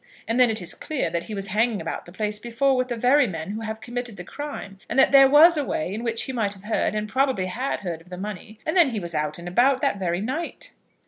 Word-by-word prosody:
And 230 +2 0
then 250 -2 +6
it 220 -4 +1
is 175 - -1
clear 310 -4 -3
that 170 0 -2
he 215 - -6
was 195 0 -5
hanging 220 +2 +1
about - - -5
the - - -11
place 210 +2 -2
before 260 +4 +1
with 255 0 0
the 245 - -3
very 255 +3 +4
men 165 -1 -5
who 220 +2 -5
have 220 0 -5
committed 245 -3 -5
the 180 - -7
crime; 200 -5 -7
and - - -2
that 265 - +5
there 270 -1 +8
was 315 +4 +7
a 295 - +1
way 180 - -2
in 220 +3 -4
which 230 -1 0
he - - -4
might 220 -5 -1
have 190 - -16
heard 215 0 0
and 215 0 -2
probably 260 -3 +1
had 245 +9 -3
heard 170 -4 -5
of 175 - -20
the 180 - -7
money; 210 +2 -7
and 315 - -1
then 345 -6 +6
he 225 -4 -3
was 170 -3 -6
out 150 -1 -2
and 170 0 -9
about 250 +9 +3
that 275 -8 0
very 175 -2 -1
night." 265 - -4
220 Hz, 275 wpm, -24 LUFS, 195-260 Hz, -, there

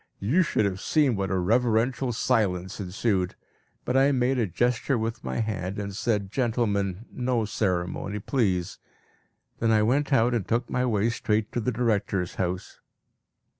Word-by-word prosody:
You 130 - +2
should 130 - +1
have 95 -1 -2
seen 145 -6 +2
what 95 -1 -2
a 95 - 0
reverential 120 +6 +1
silence 100 -7 0
ensued. 95 -1 -1 0.5
But 125 - -1
I 135 +2 +5
made 130 0 +1
a 115 - +1
gesture 120 - 0
with 115 +1 -3
my - - -2
hand, 100 -3 -3
and 100 -1 -4
said, 100 -3 -1
"Gentlemen, 110 -5 0
no 125 -3 0
ceremony 100 -1 -2
please!" 100 -6 -1 0.8
Then 115 - +1
I 110 -1 +4
went 140 +6 +1
out, 120 -2 +3
and 115 -6 -1
took 120 +1 -1
my 125 0 +1
way 110 0 +1
straight 105 -1 -1
to - - -1
the 125 +2 0
director's 105 -6 0
house. 90 0 -3
110 Hz, 160 wpm, -26 LUFS, 100-125 Hz, 0.8 s, I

